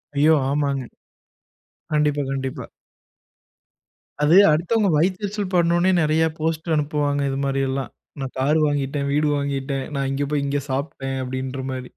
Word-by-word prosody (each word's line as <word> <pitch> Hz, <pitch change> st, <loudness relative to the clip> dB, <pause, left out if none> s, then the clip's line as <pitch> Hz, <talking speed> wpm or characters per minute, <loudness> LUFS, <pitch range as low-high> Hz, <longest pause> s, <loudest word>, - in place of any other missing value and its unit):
ஐயோ! 155 Hz, +3 st, +5 dB, 0.2 s
ஆமாங்க. 140 Hz, -2 st, 0 dB, 1.1 s
கண்டிப்பா, 150 Hz, -1 st, +2 dB
கண்டிப்பா. 135 Hz, -1 st, -4 dB, 1.6 s
அது 155 Hz, +4 st, +5 dB, 0.2 s
அடுத்தவங்க 195 Hz, +6 st, +2 dB
வயித்தெரிச்சல் 195 Hz, +3 st, -1 dB
படனுனே 175 Hz, +1 st, +3 dB
நிறைய 155 Hz, +1 st, +2 dB
போஸ்ட் 160 Hz, +1 st, -2 dB
அனுப்புவாங்க 145 Hz, -1 st, 0 dB
இது 135 Hz, -, -2 dB
மாரி 135 Hz, 0 st, 0 dB
எல்லாம். 135 Hz, 0 st, -3 dB, 0.3 s
நான் 135 Hz, -1 st, -4 dB
கார் 145 Hz, +4 st, +2 dB
வாங்கிட்டேன், 140 Hz, 0 st, -1 dB
வீடு 150 Hz, +1 st, +2 dB
வாங்கிட்டேன், 135 Hz, -1 st, -2 dB
நான் 135 Hz, -1 st, -1 dB
இங்க 140 Hz, +1 st, -1 dB
போய் 145 Hz, -1 st, 0 dB
இங்க 140 Hz, 0 st, -1 dB
சாப்ட்டேன் 135 Hz, -1 st, -3 dB
அப்டின்ற 130 Hz, +1 st, -4 dB
மாரி. 130 Hz, -1 st, -5 dB
145 Hz, 130 wpm, -22 LUFS, 135-155 Hz, 1.6 s, ஐயோ